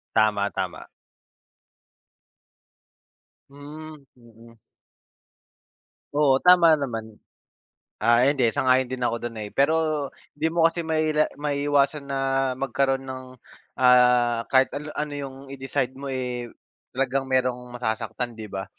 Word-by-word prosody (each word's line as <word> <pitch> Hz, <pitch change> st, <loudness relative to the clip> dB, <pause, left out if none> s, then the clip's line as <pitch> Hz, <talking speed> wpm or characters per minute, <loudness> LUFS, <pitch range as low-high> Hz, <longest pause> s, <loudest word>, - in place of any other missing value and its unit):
Tama, 105 Hz, -2 st, +2 dB
tama. -, -, -5 dB, 2.6 s
Hmm, 150 Hz, +3 st, -10 dB, 0.2 s
mm. 115 Hz, -1 st, -18 dB, 1.6 s
Oo, 140 Hz, -2 st, +3 dB
tama 180 Hz, -2 st, +6 dB
naman. 115 Hz, -7 st, -3 dB, 0.8 s
Ah, 120 Hz, +2 st, +4 dB
hindi 135 Hz, -5 st, +3 dB
sang-ayon 130 Hz, +2 st, +2 dB
din 125 Hz, -1 st, -1 dB
ako 115 Hz, 0 st, -2 dB
do'n, 120 Hz, -1 st, -5 dB
eh, -, -, -10 dB
pero 155 Hz, 0 st, +1 dB, 0.3 s
'di 160 Hz, -, 0 dB
mo 165 Hz, 0 st, +4 dB
kasi 170 Hz, +1 st, -1 dB
maila 155 Hz, -1 st, +1 dB
maiiwasan 145 Hz, 0 st, 0 dB
na 135 Hz, -, -1 dB, 0.4 s
magkaro'n 135 Hz, 0 st, 0 dB
nang 130 Hz, -1 st, -9 dB, 0.4 s
ah 125 Hz, -2 st, +4 dB
kahit 130 Hz, 0 st, +4 dB
an 150 Hz, +1 st, -5 dB
ano 150 Hz, -1 st, -2 dB
yung 135 Hz, -2 st, -6 dB, 0.2 s
i-decide 135 Hz, -1 st, -2 dB
mo, 135 Hz, +1 st, -7 dB
eh, 125 Hz, -2 st, -4 dB, 0.4 s
talagang 135 Hz, +1 st, -1 dB
mayrong 125 Hz, -1 st, 0 dB
masasaktan 120 Hz, 0 st, -3 dB
'di 110 Hz, -2 st, -9 dB
ba? 95 Hz, 0 st, -5 dB
130 Hz, 115 wpm, -24 LUFS, 120-145 Hz, 2.6 s, tama